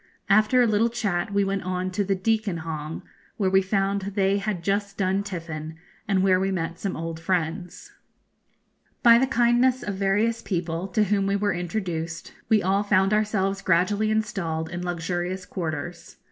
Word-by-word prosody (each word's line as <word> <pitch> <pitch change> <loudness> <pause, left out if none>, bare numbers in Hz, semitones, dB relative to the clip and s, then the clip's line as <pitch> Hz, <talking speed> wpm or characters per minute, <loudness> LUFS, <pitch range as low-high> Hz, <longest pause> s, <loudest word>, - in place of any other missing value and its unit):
After 215 +5 +5
a - - +4
little 220 +1 +2
chat 205 -6 -2
we 200 0 +2
went 195 0 -1
on 185 +1 -2
to 200 +2 0
the 195 0 0
Deacon 205 -3 0
Hong, 155 -1 -5 0.3
where 190 -3 +1
we 190 0 +5
found 195 +1 0
they 195 0 +1
had 200 -4 -3
just 200 +1 -1
done 190 0 +1
tiffin, 165 -5 -6 0.3
and 195 -2 +2
where 185 -1 +4
we 190 +1 0
met 170 -3 -3
some 195 - -3
old 165 0 -5
friends. 175 +1 -3 1.1
By 235 0 +8
the 265 - +2
kindness 245 +1 +3
of 205 - -3
various 205 +4 +1
people, 170 -1 -2
to 210 +3 +1
whom 200 -1 +1
we 200 - +1
were 205 0 +1
introduced, 175 -2 -4 0.2
we 215 -2 +4
all 195 +2 +2
found 200 -1 +2
ourselves 200 -2 0
gradually 200 +5 +2
installed 170 -7 -1
in 175 +1 -4
luxurious 175 +1 -3
quarters. 170 -1 -5
195 Hz, 170 wpm, -25 LUFS, 175-205 Hz, 1.1 s, By